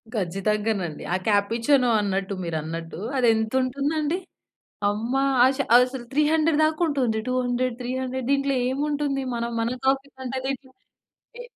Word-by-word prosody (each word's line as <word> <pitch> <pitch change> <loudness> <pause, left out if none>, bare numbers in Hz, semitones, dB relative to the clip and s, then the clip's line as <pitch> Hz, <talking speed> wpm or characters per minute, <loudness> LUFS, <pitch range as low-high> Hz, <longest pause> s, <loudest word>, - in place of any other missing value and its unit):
ఖచ్చితంగానండి. 195 -2 -1
ఆ - - +3
కాపుచినో 230 +5 +3
అన్నట్టు, 195 0 -1
మీరన్నట్టు 165 +1 -4 0.2
అది 245 -2 +3
ఎంత 220 0 -1
ఉంటుందండి? 290 +5 -1 0.7
అమ్మ 225 +5 -2 0.3
ఆశ 265 +1 +3 0.2
ఆహ్, 245 - +9
అసలు 255 -2 -7
300 305 +1 +2
దాకా 310 +2 0
ఉంటుంది. 255 -7 0
200, 255 -1 0
త్రీ 245 0 -4
హండ్రెడ్ 260 -1 -3
దీంట్లో 275 0 +2
ఏముంటుంది? 285 0 -1
మనం 235 0 -2
మన 235 +2 -1
కాఫీ 270 +1 +2
కంటే 260 0 -4
రేటు? 270 0 -4 0.7
ఏ - - -5
255 Hz, 135 wpm, -24 LUFS, 215-275 Hz, 0.7 s, ఆహ్